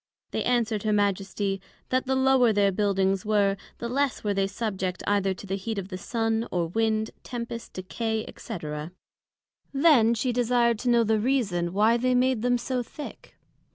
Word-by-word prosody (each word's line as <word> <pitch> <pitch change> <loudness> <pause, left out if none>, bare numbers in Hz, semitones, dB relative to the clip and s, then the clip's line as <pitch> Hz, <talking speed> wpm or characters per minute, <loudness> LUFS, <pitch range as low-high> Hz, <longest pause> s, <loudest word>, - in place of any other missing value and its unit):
They - - -1
answered 230 -4 +1
her 215 - 0
Majesty, 195 -1 0 0.3
That 255 +1 0
the 265 - +1
lower 265 -3 +4
their 200 -1 +3
Buildings 195 -1 +1
were, 205 -2 +2 0.2
the 235 - -4
less 275 +2 0
were 205 -1 0
they 195 0 +1
subject 195 -3 -3
either 195 -2 +1
to 195 - -10
the 190 - -4
heat 220 +2 -4
of 195 -1 -4
the 185 - -5
Sun, 225 +1 -1
or 175 -2 0
Wind, 220 +2 0
Tempest, 235 -1 -6
Decay, 220 +4 -3
&c. 225 - -6 1.1
Then 275 -6 +5
she 245 +2 -1
desired 240 -1 +2
to 250 - -1
know 235 -1 +5
the 220 0 +2
reason, 210 -9 0
why 215 +5 +3
they 255 +1 +1
made 250 -2 +2
them 245 +1 +2
so 250 +1 -2
thick? 285 +5 -10
220 Hz, 175 wpm, -26 LUFS, 200-245 Hz, 1.1 s, Then